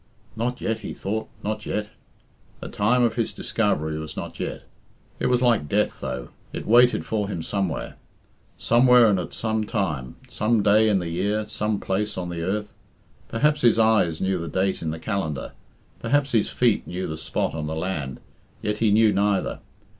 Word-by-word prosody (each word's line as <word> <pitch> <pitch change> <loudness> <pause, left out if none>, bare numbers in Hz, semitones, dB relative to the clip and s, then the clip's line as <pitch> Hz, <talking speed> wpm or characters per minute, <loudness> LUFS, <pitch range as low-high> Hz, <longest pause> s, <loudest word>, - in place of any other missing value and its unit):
"Not 120 +3 -2
yet," 110 0 -1
he - - -6
thought, 110 +3 -3
"not 110 +1 -3
yet." 105 0 -2 0.7
The - - -7
time 120 +5 +2
of 120 - +2
his 115 -2 -1
discovery 80 -8 -1
was 80 0 -7
not - - -6
yet. - - -4 0.6
It - - +1
was 125 0 +2
like 115 -12 +2
Death, - - +1
though 65 -2 -5 0.2
it - - -5
waited 120 +2 +5
for 105 -2 -1
him 85 -5 -4
somewhere. 100 -4 -2 0.6
Somewhere 120 -2 +5
and 95 - +2
at 90 - -5
some 110 -1 -1
time 75 - -2
some 110 0 +1
day 110 +2 +5
in 100 - +3
the 90 -2 -3
year, 105 +5 -1
some 105 -1 -1
place 105 +2 -1
on 90 -1 -3
the 85 -1 -4
earth. 105 +5 -2 0.5
Perhaps 150 +5 +1
his 120 -2 +5
eyes 110 -8 +3
knew 95 -1 0
the 85 - -4
date 95 +2 0
in 80 - -2
the 80 - -3
calendar, 80 -6 -3 0.5
perhaps 140 +3 +1
his 110 -3 +2
feet 120 -4 +1
knew 90 +1 -3
the 80 - -4
spot 80 - -2
on 75 -1 -3
the 80 - -3
land, 80 -6 -3 0.4
yet 105 0 -1
he 115 - +3
knew 110 +1 +5
neither. 100 -1 +1
105 Hz, 185 wpm, -24 LUFS, 90-115 Hz, 0.7 s, waited